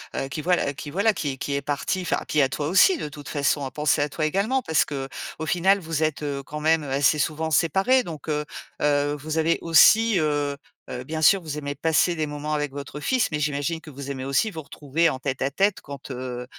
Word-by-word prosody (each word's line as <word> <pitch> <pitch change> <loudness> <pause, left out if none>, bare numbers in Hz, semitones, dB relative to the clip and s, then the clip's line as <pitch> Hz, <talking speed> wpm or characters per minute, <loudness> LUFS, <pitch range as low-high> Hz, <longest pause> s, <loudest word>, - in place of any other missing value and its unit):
heu, 135 - -2
qui 155 - -4
voi 180 +4 +3 0.2
qui 145 - -7
voilà 205 +6 +2
qui 145 -7 -2
est 135 - -7
qui 140 - -3
est 140 - -1
parti, 145 +6 -2
enfin, - - 0
puis 150 - +2
à 135 - +4
toi 145 +2 -3
aussi 345 - +5
de 150 - -5
toute 145 -1 -11
façon, 145 -1 0
à 130 - -6
penser 150 +1 +1
à 145 - +1
toi 155 +2 -2
également 200 +11 0
parce 160 -9 +2
qu'au 140 +2 -6
final, 190 +4 +3
vous 160 -2 -2
êtes, 155 -1 -1
heu, 140 -1 -3
quand 150 +1 -7
même, 160 0 +3
heu, 135 - -6
assez 140 +3 +3
souvent 160 +1 -1
séparés, 190 - +3
donc 160 -2 -8
heu, 150 0 -1 0.4
heu, 145 0 +2
vous 155 +3 -4
avez 165 +1 +2
aussi, 205 +6 +6
heu 145 -2 0 0.4
heu, 125 0 -5
bien 155 +3 -4
sûr, 195 +5 +6
vous 155 -3 -6
aimez 145 -1 -4
passer 165 +2 +2
des 155 -1 -2
moments 150 +1 -4
avec 150 -2 -1
votre 140 +1 -7
fils 255 - +1
mais 150 - -1
j'imagine 150 +3 -1
que - - -12
vous 140 -1 -8
aimez 130 -1 -5
aussi 140 +11 +1
vous 160 - -6
retrouver 155 +3 0
en 130 - -3
tête 135 0 -3
à 135 - +1
tête 195 0 +1
quand, 140 -1 -9
heu 125 -1 -5
150 Hz, 240 wpm, -24 LUFS, 140-165 Hz, 0.4 s, aussi